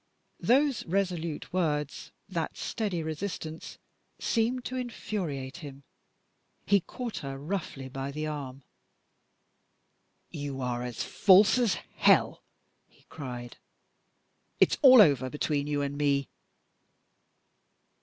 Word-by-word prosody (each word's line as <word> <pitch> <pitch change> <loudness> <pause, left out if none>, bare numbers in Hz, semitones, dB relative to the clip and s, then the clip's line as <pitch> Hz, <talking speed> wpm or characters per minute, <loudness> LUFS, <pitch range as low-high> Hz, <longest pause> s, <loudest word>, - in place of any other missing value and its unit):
Those 275 +1 +2
resolute 175 -4 -2
words, 150 -5 -1 0.2
that 170 -5 -3
steady 195 -7 -2
resistance, 160 0 -5 0.4
seemed 240 +2 0
to 255 - -4
infuriate 180 - -4
him. 140 -4 -10 0.8
He 200 0 +4
caught 235 +5 -6
her 135 -1 -6
roughly 145 -3 -4
by 135 +1 -5
the 155 +2 -4
arm. 140 -3 -6 1.7
"You 145 -4 -5
are 125 -2 -2
as 125 -2 -4
false 200 +4 +5
as 235 -5 +2 0.2
hell!" - - +4 0.5
he - - -27
cried. 125 -5 -7 1.0
"It's - - +4
all 260 -5 +10
over 135 -5 +2
between 145 0 -1
you 145 -1 0
and 140 0 -3
me!" 140 -2 +1
155 Hz, 105 wpm, -29 LUFS, 140-200 Hz, 1.7 s, all